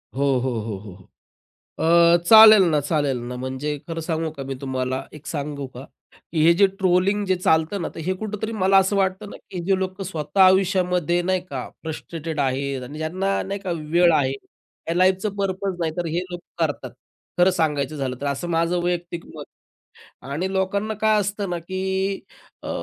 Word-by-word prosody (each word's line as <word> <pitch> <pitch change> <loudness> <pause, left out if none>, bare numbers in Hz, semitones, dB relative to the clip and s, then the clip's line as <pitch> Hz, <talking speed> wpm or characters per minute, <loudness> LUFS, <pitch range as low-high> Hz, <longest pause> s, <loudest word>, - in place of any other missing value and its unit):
हो, 135 - -2 0.2
हो, 130 - 0
हो, 110 -1 -4 0.8
हो, 170 +1 +3
अ, - - +7
चालेल 220 0 +9
ना 150 -2 +2
चालेल 145 -3 0
ना 125 - -5
म्हणजे 130 +4 -3
खरं 165 0 -4
सांगू 160 0 -2
का, 150 -3 -8
मी 135 0 -4
तुम्हाला 130 -1 -2
एक 150 -1 -13
सांगू 145 -2 -4
का. 130 - -8 0.5
हे 160 +1 +5
जे 200 +3 +5
ट्रोलिंग 190 +1 +1
जे 185 -1 +2
चालतं 165 +2 +1
ना, - - -2
तर - - -7
हे 180 +4 -1
कुठेतरी 220 +1 -4
मला 195 -2 +4
असं 195 +1 +2
वाटतं 190 +1 -1
ना, - - -9
की 185 - -6
जे 195 0 +3
लोकं 190 +1 -4
स्वतः 160 -1 -3
आयुष्यामध्ये 180 -2 +2
नाही 185 +1 0
का 130 -3 -5
फ्रस्ट्रेटेड 160 -1 -5
आहेत 135 0 -1
आणि 145 +5 -8
ज्यांना 185 +5 -1
नाही 200 +1 -5
का 190 - -5 0.2
वेळ 170 +1 +5
आहे, 140 -4 +2 0.6
या 165 - 0
लाईफच 185 +2 +3
पर्पज 195 -1 -2
नाही, 160 -2 -1
तर 175 -1 -2
हे 165 +2 -1
लोकं 175 -1 -3
करतात. 145 - -6 0.5
खरं 180 +2 +5
सांगायचं 150 -4 -1
झालं 130 -3 -3
तर 145 - -3
असं 140 +5 -2
माझं 170 +1 +1
वैयक्तिक 175 -1 -3
मत 150 -2 -7 0.9
आणि 180 +7 -2
लोकांना 200 +3 -1
काय 215 -1 +3
असतं 205 -1 -3
ना 175 - -2
की 185 +3 -6 0.8
अ, - - -7
170 Hz, 180 wpm, -23 LUFS, 150-190 Hz, 0.9 s, चालेल